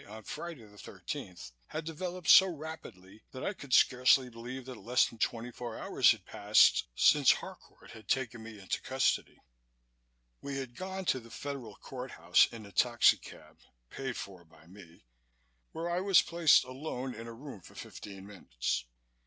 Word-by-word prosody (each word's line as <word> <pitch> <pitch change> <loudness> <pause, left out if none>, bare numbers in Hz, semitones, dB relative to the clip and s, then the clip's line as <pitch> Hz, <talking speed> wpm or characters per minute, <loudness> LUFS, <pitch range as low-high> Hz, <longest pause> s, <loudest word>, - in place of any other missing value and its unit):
on 110 +1 -10
Friday 165 +1 -7
the 105 -1 -17
thirteenth, 90 -7 -8 0.2
had 155 +1 -5
developed 175 +1 -5
so 190 - +9
rapidly 145 - -9
that 130 - -8
I 200 - -1
could 140 -8 -12
scarcely 125 0 +5
believe 120 +3 -8
that 130 -3 -9
less 125 +2 +3
than 115 - -13
twenty 115 +2 -2
four 120 -2 -7
hours - - +3
had - - +1
passed - - +4
since - - +6
Harcourt - - -11
had 110 -2 -13
taken 120 -3 -1
me 110 -1 -10
into 95 - -3
custody. - - 0 1.0
We 140 -1 -5
had 130 -3 -6
gone 190 0 -5
to 130 - +1
the 115 -1 -15
Federal 140 -2 -7
Court 130 0 -8
House 85 +2 +4
in 115 -2 -9
a 100 - -13
taxicab 120 +5 +1 0.3
(paid 135 -2 -5
for 95 -3 -8
by 80 -1 -21
me) 85 -6 -16 0.7
where 165 +1 -4
I 175 +1 -1
was 195 -2 +5
placed 170 -3 +4
alone 130 -1 -5
in 115 0 -9
a 115 - -8
room 130 -4 -10
for - - -16
fifteen 95 -1 -10
minutes. - - -3
125 Hz, 170 wpm, -31 LUFS, 105-145 Hz, 1.0 s, so